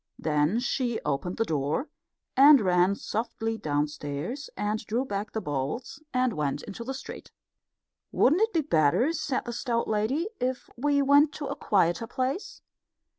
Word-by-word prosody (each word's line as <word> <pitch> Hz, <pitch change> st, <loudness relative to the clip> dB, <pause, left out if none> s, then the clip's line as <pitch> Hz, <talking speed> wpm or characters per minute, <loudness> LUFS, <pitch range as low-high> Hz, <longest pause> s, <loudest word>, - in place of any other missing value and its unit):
Then 155 Hz, +7 st, +1 dB
she 245 Hz, -2 st, -1 dB
opened 150 Hz, +5 st, -2 dB
the 225 Hz, -, +1 dB
door 150 Hz, -, -1 dB, 0.5 s
and 280 Hz, +1 st, +8 dB
ran 185 Hz, -1 st, +3 dB
softly 225 Hz, +1 st, -3 dB
downstairs, 150 Hz, -, -3 dB
and 210 Hz, +1 st, -1 dB
drew 235 Hz, +5 st, -1 dB
back 205 Hz, -2 st, -4 dB
the 220 Hz, -, -3 dB
bolts, 145 Hz, -, -4 dB
and 255 Hz, -2 st, +1 dB
went 145 Hz, -4 st, -2 dB
into 225 Hz, +1 st, -7 dB
the 265 Hz, +3 st, -4 dB
street. 270 Hz, -, -9 dB, 0.8 s
"Wouldn't 315 Hz, +10 st, +3 dB
it 450 Hz, +1 st, +3 dB
be 330 Hz, -, +2 dB
better," 245 Hz, -, +2 dB
said 275 Hz, -5 st, -2 dB
the 240 Hz, -, -4 dB
stout 235 Hz, -1 st, -1 dB
lady, 220 Hz, -, 0 dB
"if 250 Hz, 0 st, -3 dB
we 285 Hz, +2 st, +2 dB
went 285 Hz, +2 st, +5 dB
to 295 Hz, -, -5 dB
a -, -, -3 dB
quieter 185 Hz, +2 st, +1 dB
place?" 260 Hz, -, -3 dB
225 Hz, 155 wpm, -27 LUFS, 175-270 Hz, 0.8 s, and